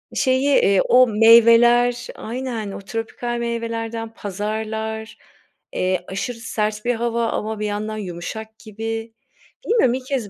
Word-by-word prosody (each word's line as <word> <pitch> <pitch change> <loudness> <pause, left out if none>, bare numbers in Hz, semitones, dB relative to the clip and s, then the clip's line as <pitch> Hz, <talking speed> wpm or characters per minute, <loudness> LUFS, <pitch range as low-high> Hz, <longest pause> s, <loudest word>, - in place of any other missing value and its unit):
şeyi, 260 0 +2
eee, 200 -8 +4
o 255 0 +5
meyveler 235 +2 +5
Aynen. 230 -3 -5
O - - -7
tropikal 225 +3 -4
meyvelerden 230 -1 -4
pazarlar, 220 +2 -4 0.6
eee, 185 -1 -1
aşırı 225 +5 -4
sert 215 -1 -3
bir 245 -1 +1
hava 235 0 -1
ama 215 0 -3
bir 210 - -2
yandan 210 +1 -3
yumuşak 215 +4 -7
gibi. 225 +1 -5 0.5
Bilmiyorum 440 - +3
ilk 255 0 -4
kez 260 -7 -2
225 Hz, 130 wpm, -21 LUFS, 215-235 Hz, 0.6 s, o